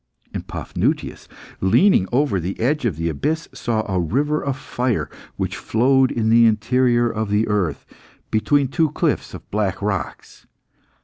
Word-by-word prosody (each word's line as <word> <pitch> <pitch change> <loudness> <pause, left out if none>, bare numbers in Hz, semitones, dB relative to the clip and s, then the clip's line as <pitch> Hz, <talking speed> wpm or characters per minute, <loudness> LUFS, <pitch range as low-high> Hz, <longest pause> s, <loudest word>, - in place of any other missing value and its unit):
And - - -5
Paphnutius, - - -3 0.3
leaning 95 - +4
over 130 -6 +1
the 90 +3 -4
edge 135 +4 0
of 105 -9 0
the 85 +2 -2
abyss, 150 - -2
saw 110 -2 -2
a 95 -2 0
river 145 - 0
of 135 -1 -2
fire 125 -3 -2 0.2
which - - -3
flowed 130 +3 +2
in 110 -2 0
the 115 0 +6
interior 120 +2 +2
of 110 -2 -2
the 105 +2 +1
earth, 95 -8 -1 0.5
between 140 +6 +2
two 160 +4 +1
cliffs - - -1
of - - -11
black 100 -3 -1
rocks. 100 -1 -4
115 Hz, 150 wpm, -21 LUFS, 100-135 Hz, 0.5 s, the